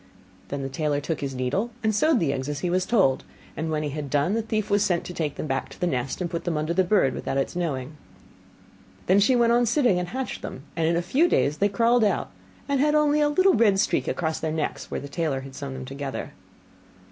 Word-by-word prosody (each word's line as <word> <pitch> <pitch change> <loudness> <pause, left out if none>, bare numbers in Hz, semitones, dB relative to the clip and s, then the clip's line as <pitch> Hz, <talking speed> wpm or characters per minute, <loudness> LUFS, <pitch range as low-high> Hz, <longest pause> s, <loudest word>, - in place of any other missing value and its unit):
Then 140 -1 -4
the - - -2
tailor 145 +1 -1
took 155 +2 -3
his 135 -2 -3
needle, 130 - -1
and 220 0 +2
sewed 295 +5 +3
the 160 -7 +1
eggs 130 +1 -3
as 145 0 -4
he 175 - -1
was 185 +1 +1
told; 190 - +3 0.3
and 160 +2 -3
when 155 -1 -1
he 150 - -2
had 145 0 -5
done, 145 +7 +1
the 225 - +1
thief 215 -2 -2
was 205 0 +4
sent 175 -4 +1
to 180 - -7
take 155 -5 -2
them - - -4
back 135 -2 -2
to - - -13
the - - 0
nest, 130 -5 -2
and 180 - 0
put 170 - -3
them 170 -3 -1
under 155 +2 -1
the 190 +2 +3
bird 180 -7 +2
without 135 - -3
its 135 - -1
knowing 145 -7 -2
it. - - -14 1.1
Then 190 +2 +4
she 230 +6 +4
went 235 -1 +4
on 240 0 +3
sitting, 235 -6 +3
and 180 - -3
hatched 260 +6 -4
them: 130 - -7
and 165 -1 +1
in 170 - +2
a 170 - 0
few 285 - +3
days 150 - +1
they 205 - +3
crawled 230 +3 +3
out, 210 - 0 0.4
and 280 -1 +1
had 300 +2 +3
only 300 0 +3
a 295 - +3
little 370 +6 +4
red 210 -4 +4
streak - - +1
across 160 -2 -1
their 160 - -2
necks, 155 -1 -3
where - - -3
the 140 - -7
tailor 145 -2 -2
had 135 0 -10
sewn 140 -1 -6
them 130 0 -6
together. 135 0 -5
170 Hz, 255 wpm, -25 LUFS, 145-220 Hz, 1.1 s, was